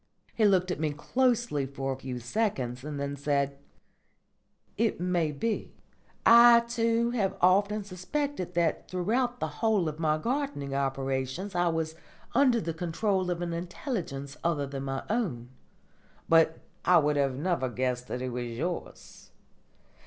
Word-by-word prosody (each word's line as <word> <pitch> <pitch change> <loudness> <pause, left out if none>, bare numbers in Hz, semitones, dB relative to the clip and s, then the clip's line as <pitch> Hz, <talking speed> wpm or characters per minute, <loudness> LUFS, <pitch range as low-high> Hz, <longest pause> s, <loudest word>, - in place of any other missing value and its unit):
He 220 - +2
looked 185 -2 +3
at - - -3
me 155 -2 0
closely 235 - +1
for 135 0 -3
a - - -5
few 130 -1 -6
seconds, 125 - -2
and 145 -1 -5
then 140 0 -3
said: 140 -1 -1 1.2
"It 225 -3 0
may 175 -3 +1
be. 215 +10 -3 0.5
I 235 0 +9
too 235 0 +1
have 200 -6 -1
often 200 +3 +3
suspected 190 - -3
that 170 -2 0
throughout 240 +7 0
the - - -1
whole 215 -6 +2
of 155 0 -4
my 155 -1 +2
gardening 245 - -2
operations 135 +6 -2
I 175 0 +2
was 160 -1 -1 0.4
under 255 -2 +4
the 165 -4 -3
control 180 +3 -1
of 175 0 -2
an 170 -1 -3
intelligence 170 - -4
other 155 -4 +1
than 135 0 -5
my 135 0 -3
own. 175 - -2 0.8
But 165 -1 +4 0.3
I 180 - +6
would 150 -2 +2 0.2
never 165 -3 0
have 120 - -8
guessed 125 -1 -1
that 125 - -4
it 130 - -2
was 120 0 -3
yours. 155 +10 -6
170 Hz, 150 wpm, -29 LUFS, 140-215 Hz, 1.2 s, I